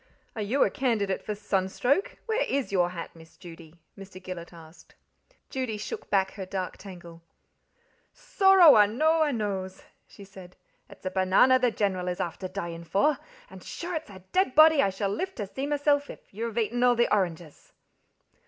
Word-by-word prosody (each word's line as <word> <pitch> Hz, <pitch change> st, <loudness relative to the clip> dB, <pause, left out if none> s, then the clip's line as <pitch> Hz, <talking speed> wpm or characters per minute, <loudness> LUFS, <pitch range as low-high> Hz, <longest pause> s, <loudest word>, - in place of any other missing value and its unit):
"Are 220 Hz, -, -4 dB
you 230 Hz, +7 st, +1 dB
a -, -, 0 dB
candidate 215 Hz, -7 st, -1 dB
for 210 Hz, -, -4 dB
sunstroke 205 Hz, -, -1 dB
where 455 Hz, +1 st, -1 dB
IS 275 Hz, -5 st, -2 dB
your 180 Hz, -3 st, +2 dB
hat, 170 Hz, -2 st, -8 dB
Miss 160 Hz, 0 st, -17 dB
Judy?" 165 Hz, -2 st, -13 dB, 0.2 s
Mr. 195 Hz, -2 st, -11 dB
Gillet 180 Hz, -2 st, -8 dB
asked. 165 Hz, -1 st, -16 dB, 0.6 s
Judy 255 Hz, -5 st, -3 dB
shook 210 Hz, -, -7 dB
back 190 Hz, -1 st, +1 dB
her 195 Hz, -2 st, -7 dB
dark 185 Hz, -1 st, -4 dB
tangle: 175 Hz, -4 st, -12 dB, 0.9 s
"Sorrow 385 Hz, -, +5 dB
a 210 Hz, -1 st, +6 dB
know 315 Hz, +9 st, +1 dB
I 310 Hz, -, +3 dB
knows," 195 Hz, -5 st, -4 dB, 0.2 s
she 200 Hz, -, -14 dB
said 190 Hz, -2 st, -14 dB, 0.3 s
"it's -, -, -16 dB
a 185 Hz, -, -2 dB
banana 190 Hz, +8 st, +4 dB
the 250 Hz, -1 st, +2 dB
General 190 Hz, -5 st, -2 dB
is 180 Hz, 0 st, -3 dB
afther 180 Hz, +2 st, -4 dB
dyin' 170 Hz, -3 st, -6 dB
for, 200 Hz, -, +1 dB, 0.3 s
and -, -, -13 dB
sure 350 Hz, +1 st, -6 dB
it's 320 Hz, -5 st, -5 dB
a 190 Hz, -2 st, -13 dB
dead 370 Hz, -8 st, +1 dB
body 310 Hz, -1 st, +7 dB
I 195 Hz, -, +2 dB
shall 195 Hz, +1 st, -3 dB
live 375 Hz, -, -4 dB
to 210 Hz, -, -4 dB
see 265 Hz, +8 st, -5 dB
misself 290 Hz, 0 st, +1 dB
if -, -, -13 dB
you've 225 Hz, +2 st, -5 dB
eaten 235 Hz, +2 st, -1 dB
all 245 Hz, -1 st, +4 dB
the 235 Hz, -2 st, +2 dB
oranges." 175 Hz, -6 st, -3 dB
200 Hz, 180 wpm, -27 LUFS, 185-260 Hz, 0.9 s, body